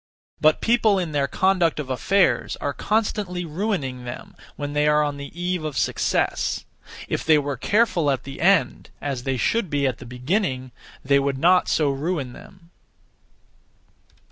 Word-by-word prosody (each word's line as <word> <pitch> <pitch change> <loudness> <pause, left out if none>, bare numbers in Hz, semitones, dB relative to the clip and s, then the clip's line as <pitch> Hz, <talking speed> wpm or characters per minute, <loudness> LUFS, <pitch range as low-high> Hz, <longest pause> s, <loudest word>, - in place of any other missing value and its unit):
(But) 155 0 +4
people 225 -3 +3
in 175 -4 -2
their 140 -2 +1
conduct 185 -1 +1
of 135 -3 -4
affairs 190 +9 +2
are 145 - -3
constantly 205 -5 -1
ruining 150 - -3
them 120 0 -8 0.2
when 145 0 -5
they 150 0 +2
are 150 0 +4
on 145 -1 -2
the 140 0 -7
eve 180 -1 -1
of 150 -4 -4
success. - - 0 0.4
If - - -2
they 155 -1 +5
were 145 -1 -1
careful 185 - +2
at 135 -2 0
the 135 0 -8
end, 190 0 +2
as 135 -4 -4
(they 135 -1 0
should 205 - 0
be) 145 -1 0
at 130 -4 -1
the 125 - -10
beginning, 130 - -2 0.3
they 140 +1 +4
would 140 -1 -1
not 180 +5 +4
so 150 -3 +2
ruin 140 -2 -3
them. 175 +2 -15
150 Hz, 165 wpm, -23 LUFS, 135-185 Hz, 0.4 s, they